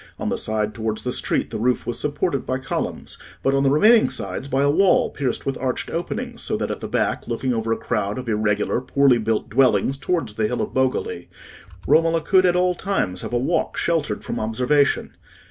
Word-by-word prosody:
On - - -3
the - - 0
side 110 -1 -1
towards 110 -1 -3
the 125 - -2
street - - -1
the - - -4
roof 125 +2 0
was 120 - -3
supported 145 -1 -1
by 130 - -2
columns; 130 - -4 0.2
but 135 - +2
on 135 - +2
the 135 - +3
remaining 215 - +5
sides, - - -5
by 135 +1 +1
a 145 - +4
wall 190 +5 +3
pierced 135 -4 -3
with 135 -1 -2
arched 130 -1 -2
openings, 170 +1 -4
so - - -2
that - - -2
at - - -4
the - - -5
back, - - -1
looking 125 +2 -1
over 115 -1 -2
a 115 - +1
crowd 105 +1 -2
of 130 -1 -6
irregular, 105 +1 0
poorly 135 -2 +3
built 110 0 -1
dwellings 130 +1 +2
towards 140 -7 -1
the 110 0 0
hill 125 - -3
of - - -6
Bogoli, 130 - -1 0.6
Romola 165 0 +3
could 185 +3 +4
at 175 - +2
all 180 0 +2
times 135 - -2
have - - -6
a 120 - +1
walk 135 +8 -1
sheltered 155 -11 -1
from - - -4
observation. 125 +6 +1
130 Hz, 210 wpm, -22 LUFS, 115-150 Hz, 0.6 s, remaining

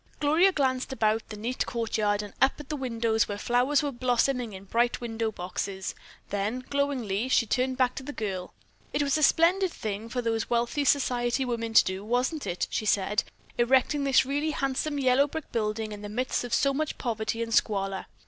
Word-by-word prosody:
Gloria 315 +6 +4
glanced 265 -6 0
about 220 -3 0
the 215 - -7
neat 235 +4 -2
courtyard 215 -3 0
and 205 - -9
up 265 - +5
at 295 +1 -6
windows 230 -5 0
where 205 - -4
flowers 250 +7 +2
were 290 - -1
blossoming 245 -1 0
in 190 0 -9
bright 235 +4 +1
window 225 -2 -2
boxes, 190 0 -4 0.4
then 210 +6 -2
glowingly 260 -6 -1
she 245 - +3
turned 255 +3 0
back 255 -1 +2
to - - -6
the 280 +2 -6
girl: 195 -8 -4 0.4
"It 290 - +1
was 280 -1 +1
a - - -2
splendid 345 +5 +4
thing 215 -2 -5
for 245 +1 -2
those 225 -1 -1
wealthy 240 +5 0
society 250 -2 +2
women 230 -2 -3
to - - +9
do, 190 +1 -4
wasn't 250 +7 -1
it," 175 - -1
she 215 - -2
said, 205 +1 +2 0.4
"erecting 265 +4 +3
this 270 -1 +4
really 290 +4 -1
handsome 285 +1 -1
yellow 270 +1 +3
brick 320 +1 -7
building 215 -1 -2
in 205 -1 -7
the 205 - -6
midst 250 +5 -1
of 245 - -6
so 275 +4 +3
much 305 +2 -2
poverty 225 -1 -2
and 230 0 -4
squalor. 195 -4 +1
240 Hz, 190 wpm, -27 LUFS, 215-275 Hz, 0.4 s, to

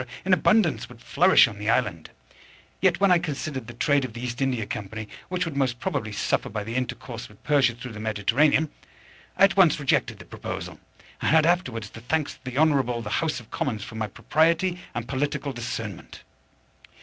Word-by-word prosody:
in 190 - +3
abundance 215 +4 +3
would - - -13
flourish - - +5
on - - -9
the - - -2
island; - - 0 0.7
yet, - - +3
when 195 -1 +4
I 175 - +6
considered 145 -6 -4
the 120 - -9
trade 140 +3 +2
of 125 -4 -5
the 120 - -7
East 125 +1 -4
India 125 -5 0
Company, 110 +1 -6 0.2
which 180 0 -1
would 165 -3 -5
most 130 -4 0
probably 105 -3 -2
suffer 100 - -1
by 105 0 -4
the 115 +2 -6
intercourse 125 -2 -4
with 105 - -20
Persia 140 -5 +3
through 125 0 -8
the 110 - -8
Mediterranean, 115 +9 +2 0.7
I - - +4
at 195 0 +6
once 175 -7 +5
rejected 140 -2 +1
the - - -12
proposal, - - -6 0.4
and - - +1
had 155 0 +5
afterwards 125 - 0
the 115 - -11
thanks 150 +5 -1
of - - -22
the 130 0 -5
Honourable 135 -6 +2
the 105 - -5
House 160 -4 -1
of 115 - -16
Commons 110 -6 -2
for - - -9
my 110 -1 -2
propriety 165 - +1 0.2
and 120 -1 -3
political 140 +1 -2
discernment. 115 -5 -6
130 Hz, 195 wpm, -25 LUFS, 115-155 Hz, 0.7 s, I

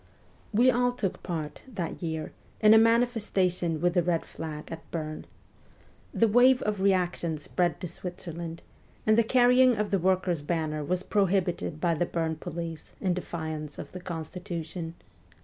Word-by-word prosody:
We 240 +4 +5
all 245 0 +2
took 205 -7 -3
part, 155 -4 -4
that 180 -7 -4
year, 160 -2 -3 0.3
in 215 0 +7
a 220 - +8
manifestation 210 -8 +2
with 175 +1 +2
the 180 - +4
red 170 -1 0
flag 155 -2 -7
at 165 0 -8
Bern. 155 -2 -5 0.8
The 230 - +3
wave 250 +4 +5
of 210 -2 -1
reaction 180 -4 +1
spread 175 +2 -1
to 180 - -3
Switzerland, 170 -1 -6 0.4
and 215 - +5
the 230 - +5
carrying 250 +1 +5
of 210 -1 -1
the 195 - +2
workers' 180 -2 +1
banner 155 -1 -2
was 180 +5 -1
prohibited 190 -6 0
by 170 +1 +2
the 170 +2 0
Bern 160 -2 -1
police 165 0 -6
in 185 -2 +1
defiance 160 -4 -5
of - - -8
the 180 - -8
constitution. 170 -1 -5
175 Hz, 155 wpm, -28 LUFS, 165-205 Hz, 0.8 s, a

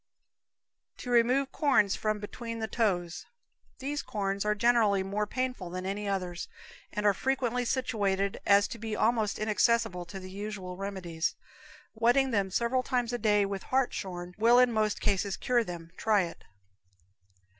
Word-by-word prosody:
To 245 - -6
Remove 250 +3 +3
Corns 265 - +3
from 215 0 -1
Between 230 +2 -6
the 220 -1 -2
Toes. 180 -8 -1 0.5
These 285 +2 -3
corns 195 -1 -2
are 210 0 +1
generally 215 -3 +3
more 205 +2 -2
painful 255 -7 -3
than 185 +1 -5
any 200 +2 -3
others, 180 -3 -3 0.4
and 210 - -3
are 205 - +5
frequently 250 0 -1
situated 200 -6 0
as 200 0 +5
to 230 - -7
be 220 -1 -3
almost 220 -2 +1
inaccessible 215 -3 +1
to 195 +2 -8
the 185 0 -9
usual 195 -2 -6
remedies. 180 -4 -3 0.6
Wetting 245 +4 +3
them 200 -3 +1
several 235 +6 +1
times 245 -2 -1
a 240 - -1
day 210 -3 +3
with 195 -1 -4
hartshorn 185 -9 -2
will 235 +2 +6
in 250 -1 +5
most 215 -1 +1
cases 200 -1 0
cure 245 -2 +2
them. 170 -4 -8
Try 210 -3 +3
it. 170 - -8
210 Hz, 155 wpm, -29 LUFS, 195-235 Hz, 0.6 s, will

